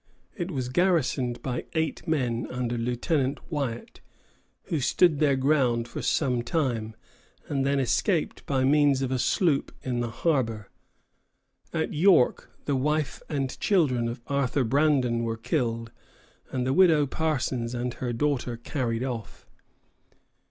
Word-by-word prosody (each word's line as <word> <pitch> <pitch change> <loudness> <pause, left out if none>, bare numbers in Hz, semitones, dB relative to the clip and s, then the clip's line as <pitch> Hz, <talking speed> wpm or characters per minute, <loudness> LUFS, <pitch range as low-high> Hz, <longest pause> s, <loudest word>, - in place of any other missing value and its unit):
It 175 -3 -3
was 130 -7 -3
garrisoned 130 -6 +1
by 125 -2 -3
eight 160 -2 -2
men 125 -7 0
under 125 -1 -2
Lieutenant 130 +4 -1
Wyatt, 135 -6 -4 0.6
who 160 - -2
stood 150 +4 +3
their 145 -3 +3
ground 130 -4 +2
for - - -6
some 125 -5 +1
time, 120 -5 -1 0.5
and 140 -2 0
then 140 0 +2
escaped 155 - 0
by 135 -2 +1
means 140 -1 +4
of 130 - -2
a 130 - 0
sloop 155 +1 +1
in 125 -2 -2
the 120 -1 -1
harbor. 115 -7 -1 1.0
At 160 -1 -2
York 165 -4 +4 0.2
the 145 - 0
wife 150 +2 -1
and 135 -4 -2
children 135 - +2
of 120 +1 -5
Arthur 140 -1 0
Brandon 130 -2 +2
were 115 -1 -2
killed, 115 -2 -2 0.6
and 125 -1 -2
the 130 - +1
Widow 160 -4 +5
Parsons 130 -5 -1
and 120 0 -2
her 125 -1 -3
daughter 125 -1 -1
carried 120 -1 -2
off. 120 -4 -6
130 Hz, 140 wpm, -27 LUFS, 120-150 Hz, 1.0 s, Widow